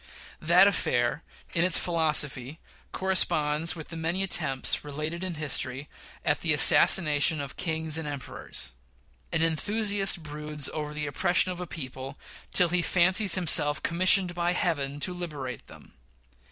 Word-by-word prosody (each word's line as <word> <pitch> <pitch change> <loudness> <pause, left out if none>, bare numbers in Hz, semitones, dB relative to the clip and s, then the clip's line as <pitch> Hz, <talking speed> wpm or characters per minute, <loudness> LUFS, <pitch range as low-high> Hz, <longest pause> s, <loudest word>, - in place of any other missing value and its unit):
That 175 +4 +5
affair, 125 -7 -1 0.3
in 170 - 0
its 185 -2 +5
philosophy, 150 -5 +1 0.3
corresponds 165 -4 +1
with 160 -2 -10
the 165 - -7
many 170 +4 -2
attempts 145 -8 0
related 155 +4 -6
in 185 -2 -4
history 140 -2 -2 0.4
at - - 0
the - - 0
assassination 150 -2 +5
of 140 -2 -7
kings 160 -2 -2
and 160 - -6
emperors. 130 - -8 0.6
An 160 - 0
enthusiast 200 +2 0
broods 150 -1 -5
over 150 -1 -5
the 150 -1 -4
oppression 175 +6 +1
of 180 - -7
a 180 - -6
people 135 -3 -8 0.3
till 180 -1 +2
he 180 +1 0
fancies 185 +2 +4
himself 155 -5 +1
commissioned 185 +1 +3
by 175 0 -1
Heaven 145 -7 -2
to 180 - -1
liberate 150 -8 -7
them. - - -17
160 Hz, 140 wpm, -26 LUFS, 145-180 Hz, 0.6 s, That